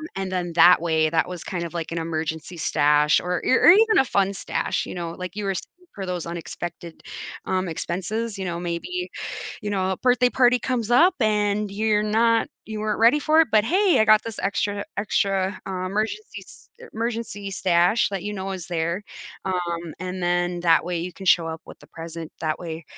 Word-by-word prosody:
and 195 -1 -3
then 175 -2 -2
that 175 +1 +7
way, 160 -2 +2
that 165 - +1
was 180 -2 -7
kind 175 -2 -4
of 170 - -8
like 165 -2 -4
an 170 - -3
emergency 160 +1 -3
stash 150 -1 +3
or 180 0 -3
or 260 - +4
or - - +9
even 440 +3 +5
a 270 - +3
fun 200 -4 +1
stash, 190 - -2
you - - -7
know, 170 -2 -4
like 180 +1 -7
you 210 - -4
were 195 - 0
saying - - -5 0.3
for 195 -2 -5
those 180 -2 -3
unexpected, 170 0 -7 0.4
um, 185 0 -1
expenses, 200 +7 -3
you 190 - -3
know, 170 -1 -3
maybe, 180 - -3 0.6
you 210 - -3
know, 190 -2 0
a - - -3
birthday 250 +2 +3
party 250 0 +3
comes 245 -3 -2
up 330 +10 +5
and 210 -2 +1
you're 210 +1 +1
not 225 +2 +2 0.2
you 220 -1 -5
weren't 215 0 -1
ready 230 +6 +5
for 310 +2 +4
it, 320 - -3
but, 215 -1 +5
"Hey, 370 - +3
I 220 - +4
got 215 0 +6
this 230 -2 -7
extra 200 +1 -1
extra, 195 -2 0
uh, 185 -1 -3
emergency 215 - -3
s - - -17
er 475 - -11
emergency 225 -3 -4
stash," 180 +2 +2
that 195 -2 -4
you 210 +1 -4
know 195 -1 -4
is 180 -4 -6
there. 170 +2 -2 0.4
Um, 175 -3 -3
and 185 0 -5
then 175 0 0
that 165 -1 +4
way, 175 0 -3
you 175 +2 -4
can 190 - -10
show 170 -2 +4
up 160 0 -5
with - - -12
the - - -16
present. 165 0 -8
That 155 -1 -1
way, 165 -2 -7
190 Hz, 210 wpm, -23 LUFS, 170-215 Hz, 0.6 s, or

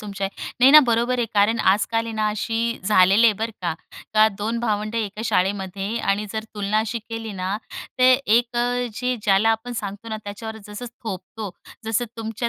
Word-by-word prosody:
तुमच्या 200 -2 -4 0.3
नाही 260 +2 +8
ना 305 - +11
बरोबर 235 +2 +1
आहे. 240 - +1
कारण 210 +3 +3
आज-काल 220 +4 +2
आहे 225 - -5
ना 215 -1 +1
अशी 225 +2 -1
झालेली 195 +2 +5
आहे 225 - +5
बरं 225 +1 -2
का. 170 -2 -1 0.4
का 215 0 +7
2 225 +3 -2
भावंडं 215 -1 -1
एका 210 -1 -4
शाळेमध्ये 195 +2 -1
आणि 210 -1 0
जर 220 -1 -3
तुलना 205 +1 0
अशी 225 +2 -1
केली 225 0 -7
ना, 190 +1 -2 0.4
तर 255 0 +6
एक 235 +2 +2
अ, 245 +1 0
जे 250 +2 -1
ज्याला 205 +1 +3
आपण 225 +2 -2
सांगतो 205 -1 -6
ना 220 - -3
त्याच्यावर 220 +2 -7
जसं 210 +3 -7 0.2
थोपतो. 205 -1 -6 0.3
जसं 225 +2 0
तुमच्या 225 +2 -3
220 Hz, 185 wpm, -23 LUFS, 205-230 Hz, 0.4 s, ना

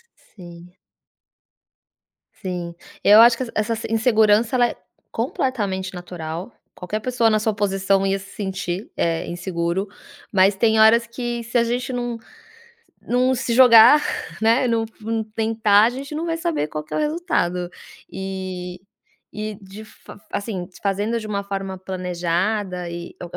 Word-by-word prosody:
S - - -30
sim. 175 -2 -12 1.6
Sim. 175 -2 -5 0.3
Eu 210 +2 +8
acho 235 0 +7
que 260 - -2
essa 215 +2 0
essa 225 - -5
insegurança, 220 0 +3
ela 245 -1 +4
é - - -7 0.4
completamente 205 -6 -2
natural, 175 +1 -6 0.2
qualquer 185 +4 -4
pessoa 240 -1 +2
na 215 - +3
sua 215 0 0
posição 195 -1 +1
ia 195 0 +1
se 195 0 -12
sentir 190 -1 -4
é 165 -1 -1
inseguro, 175 +2 -2 0.4
mas 195 0 +4
tem 220 +2 +2
horas 225 +2 +6
que 240 0 -4
se 235 +1 -1
a 235 - +4
gente 245 +2 -2
não 240 -1 -3 0.9
não 255 +2 +2
se 245 -1 -2
jogar, 250 +4 +8 0.4
né, 230 +3 +3
não 230 -1 +1 0.2
não 225 +1 -2
tentar, 220 -1 +2
a 230 - +4
gente 275 +4 -7
não 325 - -3
vai 330 -1 -1
saber 330 - -1
qual 155 0 -5
que - - -11
é - - 0
o - - 0
resultado 295 - -1 0.4
e 185 -2 -6 0.5
e 215 0 -4
de 195 +3 -11
fa 215 - -15
assim, 200 -4 -4
fazendo 205 +4 -1
de 215 - -7
uma 200 -1 -2
forma 195 -1 -5
planejada 180 +1 -2
e 170 0 -8
é - - -5
210 Hz, 155 wpm, -22 LUFS, 185-230 Hz, 1.6 s, Eu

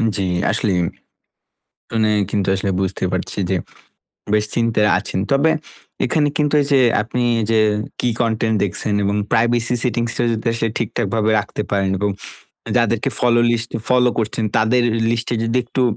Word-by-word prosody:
জ্বী, 100 -2 0 0.3
আসলেই। 100 -4 +1 1.2
অনে 110 -1 +2 0.2
কিন্তু 100 -2 -1
আসলে 95 +1 -1
বুঝতে 95 -1 -1
পারছি 95 +2 -3
যে, 95 - +2 0.8
বেশ 105 0 +3
চিন্তায় 115 -3 +2
আছেন। 100 - -4
তবে 140 +4 +3 0.5
এখানে 150 -2 +2
কিন্তু 150 -1 +1
এইযে 140 -1 +2 0.2
আপনি 120 +3 -3 0.3
যে, 110 -1 +3 0.4
কী 125 - +1
কনটেন্ট 110 -1 +1
দেখছেন 100 +2 -2
এবং 100 +1 0 0.2
প্রাইভেসি 120 +1 +2
সেটিংসটা 120 -1 -1
যদি 115 +1 -4
আসলে 115 0 -1
ঠিকঠাকভাবে 110 -1 -1
রাখতে - - -5
পারেন। 100 -1 +1
এরকম 100 +1 -1 0.6
যাদেরকে - - +1
ফলো 120 -1 +3
লিস্টে 120 0 -1
ফলো 125 -1 +4
করছেন, 110 0 -1
তাদের 115 +3 +3 0.3
লিস্টে 120 +1 -1
যদি 115 +2 -1
একটু 125 +2 -2
115 Hz, 145 wpm, -19 LUFS, 105-120 Hz, 1.2 s, ফলো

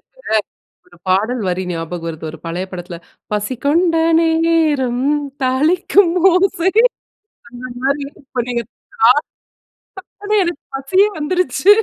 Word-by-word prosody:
எனக்கு, - - -2 0.5
ஒரு 175 - -20
பாடல் 215 +6 +1
வரி 180 +1 -1
ஞாபகம் 165 0 -5
வருது. 160 -1 -7
ஒரு 160 - -11
பழைய 175 +3 -3
படத்துல 175 -1 -7 0.3
"பசி 210 +4 -1
கொண்ட 330 +4 +3 0.3
நேரம்! 320 -6 +1 0.4
தாளிக்கும் 335 +7 +3 0.2
ஓசை" 365 0 +2 0.8
அந்த 245 +1 -11 0.2
மாரி. 280 +1 0 0.2
இப்ப 255 -2 -3
நீங்க 240 -1 -1 1.4
தாளிப்புனோன்ன, 415 0 -1
எனக்கு 345 -3 -4
பசியே 370 +10 +2
வந்துருச்சு! 360 +4 -1
270 Hz, 110 wpm, -17 LUFS, 205-340 Hz, 1.4 s, கொண்ட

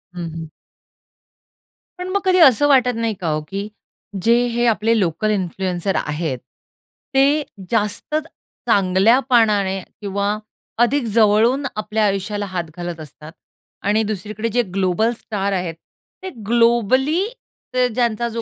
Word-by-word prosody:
हं, 170 -2 -4
हं. 165 -1 -7 1.5
पण 360 - -4
मग 400 - +1
कधी 370 -1 +4
असं 290 -2 +6
वाटत 250 -4 +4
नाही 230 -1 -1
का 170 - -2
हो? 155 0 -1
की 195 +4 -4 0.6
जे 230 +1 +5
हे 240 0 0
आपले 225 +1 +1
लोकल 185 +4 0
इन्फ्लुअन्सर्स 185 -1 -2
आहेत, 150 -3 -2 0.8
ते 280 +3 +3 0.3
जास्त 210 +6 -1 0.5
चांगल्यापणाने 205 0 +3 0.2
किंवा 200 +1 -1 0.5
अधिक 270 +1 +1
जवळून 230 +5 +4
आपल्या 215 0 0
आयुष्याला 205 +1 -1
हात 185 -2 -3
घालत 175 -2 -5
असतात 155 +1 -11 0.6
आणि 215 +2 +3
दुसरीकडे 215 +2 -4
जे 245 +3 +2
ग्लोबल 195 +4 +1
स्टार 200 -2 -3
आहेत 180 -3 -2 0.5
ते 375 - -4 0.2
ग्लोबली 240 - +3 0.5
ते 250 0 +3
ज्यांचा 235 0 0
जो 230 0 -4
215 Hz, 125 wpm, -20 LUFS, 190-240 Hz, 1.5 s, असं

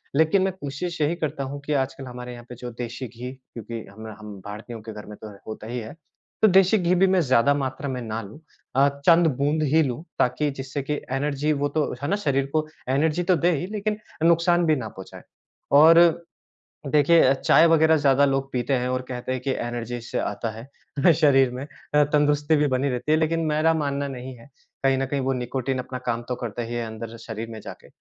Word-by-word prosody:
लेकिन 160 +6 +4
मैं 190 -1 0
कोशिश 170 +1 -5
यही 150 +3 +2
करता 155 -4 -3
हूँ 140 +2 -5
कि 150 - -1
आज 135 -1 0
कल 135 0 -9
हमारे 125 0 -7
यहाँ 120 0 -11
पे 125 - -8
जो 125 +1 -7
देशी 125 +1 -5
घी 120 +2 -8
क्योंकि 115 -3 -9
हम 110 +2 -10
र - - -7
हम 105 -1 -9
भारतीयों 110 +2 -8
के 110 0 -8
घर 105 0 -9
में 105 0 -10
तो 110 - -8 0.2
होता 110 0 -7
ही 125 +1 -4
है, 110 -1 -8 0.5
तो 220 - +7
देशी 195 +2 +5
घी 180 0 +2
भी 190 +2 +4
मैं 185 -1 +3
ज़्यादा 130 0 +3
मात्रा 135 0 -3
में 125 -1 -3
ना 110 0 -4
लूँ 105 +7 -11 0.4
अ, 140 +2 +5 0.2
चंद 170 0 +6
बूंद 150 +3 +1
ही 160 - +6
लूँ 135 +4 -3 0.2
ताकि 145 +4 +1
जिससे 135 +1 -5
कि 150 - -2 0.2
एनर्जी 140 +2 0
वो 145 0 0
तो, 150 0 -1
है - - 0
ना, 200 - +2
शरीर 140 -9 0
को 155 0 +1 0.2
एनर्जी 155 +5 +1
तो 180 0 +3
दे 175 +2 +2
ही 140 - -3
लेकिन 210 0 -2 0.2
अ, 165 - +2
नुकसान 170 +1 +4
भी 155 -1 +3
ना 120 -5 -4
पहुँचाए। 95 -1 -11 0.5
और 165 +3 +6 0.6
देखिए 150 +4 +5
अ, 130 - +5
चाय 165 +4 +4
वग़ैरह 160 0 +5
ज़्यादा 140 -1 +4
लोग 135 0 -1
पीते 125 +2 -1
हैं 125 -1 0
और 130 0 -1
कहते 125 0 -4
हैं 130 -1 -2
कि 135 - -1
एनर्जी 120 0 -4
इससे 120 - -4
आता 105 +3 -3
है 115 +4 -10 0.4
अ, 175 - +9
शरीर 135 -5 +4
में 125 +2 -6
अ, 150 0 0
तंदुरुस्ती 150 +1 +2
भी 150 0 +2
बनी 135 +1 0
रहती 125 +4 -2
है, 155 - +5
लेकिन 160 +1 +1
मेरा 155 +2 +2
मानना 140 -2 -1
नहीं 130 -1 -7
है। 115 +5 -17 0.3
कहीं 135 -1 +3
न 135 - 0
कहीं 140 +1 -2
वो 135 0 0
निकोटिन 130 +1 -2
अपना 130 0 -5
काम 115 -1 0
तो 125 - -1
करता 120 -1 -5
ही 115 - -6
है 120 -1 -2
अंदर 110 +1 -7
शरीर 115 0 -7
में 110 - -7
जाके - - -11
135 Hz, 230 wpm, -24 LUFS, 125-155 Hz, 0.6 s, अ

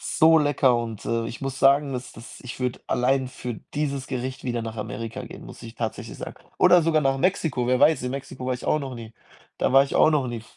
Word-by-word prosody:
so 160 0 +4
lecker 145 -4 +3
und, 115 -3 -5
äh, 115 0 -1
ich 120 - -7
muss 135 -1 -4
sagen, 140 0 +4
dass 125 0 -5
das 115 0 -12
ich 125 - -8
würde 125 -1 -2
allein 130 +1 +1
für 125 -2 -6 0.2
dieses 140 -3 -2
Gericht 130 0 -4
wieder 120 -2 -2
nach 110 0 -5
Amerika 115 +1 -5
gehen, - - -11
muss - - -12
ich 115 0 -10
tatsächlich 115 -2 -5
sagen. - - -7 0.2
Oder 180 -2 +6
sogar 155 -2 +2
nach 135 0 +1
Mexiko, 150 -8 0
wer 125 0 +3
weiß, 155 -4 +5
in 125 - -2
Mexiko 135 -1 -6
war 130 - 0
ich 125 - -9
auch 155 - +2
noch 135 -2 -6
nie 115 -1 -9 0.5
da - - +1
war 135 +1 +7
ich 140 - -7
auch 155 - +5
noch 145 -4 +1
nie. 120 -2 -5
130 Hz, 240 wpm, -24 LUFS, 120-140 Hz, 0.5 s, war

